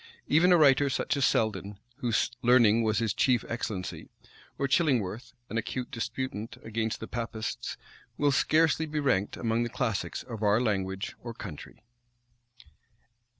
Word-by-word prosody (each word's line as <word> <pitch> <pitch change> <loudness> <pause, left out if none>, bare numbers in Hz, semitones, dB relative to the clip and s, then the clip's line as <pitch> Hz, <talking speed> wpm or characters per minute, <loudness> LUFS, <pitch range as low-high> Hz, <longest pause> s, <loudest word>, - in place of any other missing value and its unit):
Even 175 +5 +4
a 175 - +7
writer 140 -2 +5
such 130 - -1
as 140 -1 +2
Selden, 105 -2 -1 0.2
whose 120 -3 0
learning 120 -3 +5
was 110 -1 +1
his 115 -3 +1
chief 125 -4 +2
excellency, 110 -5 -4 0.5
or 140 - 0
Chillingworth, 120 - 0
an 115 - -2
acute 125 +3 -4
disputant 115 -2 -4
against 115 0 -2
the 110 - -6
Papists, 115 -2 -4 0.4
will 145 -1 +3
scarcely 160 +3 +3
be 150 0 -2
ranked 125 -9 0
among 115 0 0
the 120 - -1
classics 115 -4 -2
of 115 -4 -8
our 105 +1 +3
language 95 -4 -1
or 120 -1 -7
country. 95 0 -9
115 Hz, 145 wpm, -29 LUFS, 110-135 Hz, 0.5 s, a